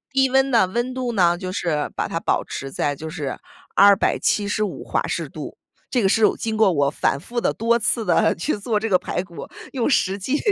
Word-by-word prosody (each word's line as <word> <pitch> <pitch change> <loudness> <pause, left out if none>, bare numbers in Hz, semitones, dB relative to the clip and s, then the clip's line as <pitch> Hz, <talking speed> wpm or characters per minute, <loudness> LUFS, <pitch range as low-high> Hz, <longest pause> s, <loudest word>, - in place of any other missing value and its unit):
低 265 0 +4
温 270 +1 +3
呢， 230 -6 +4
温 240 +6 -2
度 255 -2 -2
呢 175 -5 +3
就 185 0 -5
是 165 -6 -2
把 - - -2
它 - - -3
保 - - +1
持 135 0 -6
在 145 +1 -1
就 160 +3 -7
是 150 -4 -4 0.4
275 205 +1 +2
华 - - -1
氏 - - -3
度。 - - -8 0.3
这 250 - +2
个 195 - +3
是 220 +3 +2 0.2
经 220 -1 -2
过 215 -3 +4
我 145 -3 +2
反 140 -1 0
复 235 +10 -4
地 - - +1
多 230 +1 +1
次 225 0 -1
地 175 - +3
去 170 - -2
做 210 +1 -1
这 225 - -2
个 185 -3 +4
排 180 0 -3
骨， 170 -2 -9 0.3
用 255 -1 0
实 195 -8 +2
际 260 +9 -1
205 Hz, 220 characters per minute, -22 LUFS, 175-235 Hz, 0.4 s, 低